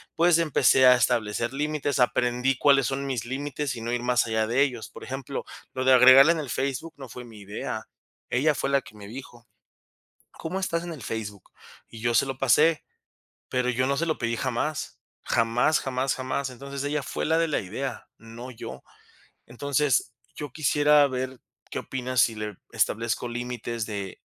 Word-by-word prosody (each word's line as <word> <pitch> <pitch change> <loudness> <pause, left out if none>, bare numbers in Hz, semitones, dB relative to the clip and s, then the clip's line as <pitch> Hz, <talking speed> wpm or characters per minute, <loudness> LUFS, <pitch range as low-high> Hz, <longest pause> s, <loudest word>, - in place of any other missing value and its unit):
pues 170 0 +4
empecé 135 -4 +4
a 125 - +8
establecer 115 0 0
límites, 145 -1 -1
aprendí 125 +1 +2
cuáles 140 -3 +4
son 135 +1 -2
mis 125 -5 -2
límites 140 +1 -3
y 115 - -7
no 115 +1 -3
ir 120 0 -1
más 125 0 +2
allá 110 -1 0
de 120 +4 +2
ellos. 125 -5 -3
Por - - -12
ejemplo, 135 +1 -5 0.3
lo 130 0 -2
de 130 - +6
agregarla 130 +4 +8
en 170 - 0
el 145 -4 -5
Facebook 135 +5 -3
no 135 -3 -9
fue 125 +2 -9
mi 115 -3 -13
idea, 100 +1 -5 0.5
ella 150 +4 +2
fue 135 +2 -2
la 140 0 +3
que 100 -1 -15
me 100 -1 -11
dijo: 120 0 -11 0.8
"¿Cómo 180 +4 -5
estás 170 -3 -1
en 175 -1 -5
el 150 - -10
Facebook?", 105 -3 -6 0.4
y 115 - -11
yo 120 0 +1
se 115 - +4
lo 135 -1 -4
pasé, 150 +5 +3 0.7
pero 125 -1 0
yo 125 +1 +1
no 140 0 0
se 170 - 0
lo 160 -2 -1
pedí 115 0 -2
jamás. 130 +5 -2 0.3
Jamás, 120 +6 +2
jamás, 130 0 -1
jamás. 130 +1 -3
Entonces, 140 +2 -6
ella 145 +1 -1
fue - - -4
la 160 +1 +2
de 165 - +2
la 155 - 0
idea, 110 +8 -5
no 115 +3 -10
yo. 115 - -9 0.6
Entonces, 140 +1 0 0.2
yo 145 -3 -6
quisiera 150 0 +4
ver 130 -1 -4 0.3
qué - - -2
opinas 130 -1 -3
si 115 -1 +4
le 105 -2 -5 0.2
establezco 115 +2 0
límites 120 -1 -4
de 100 -3 -6
130 Hz, 185 wpm, -26 LUFS, 120-140 Hz, 0.8 s, a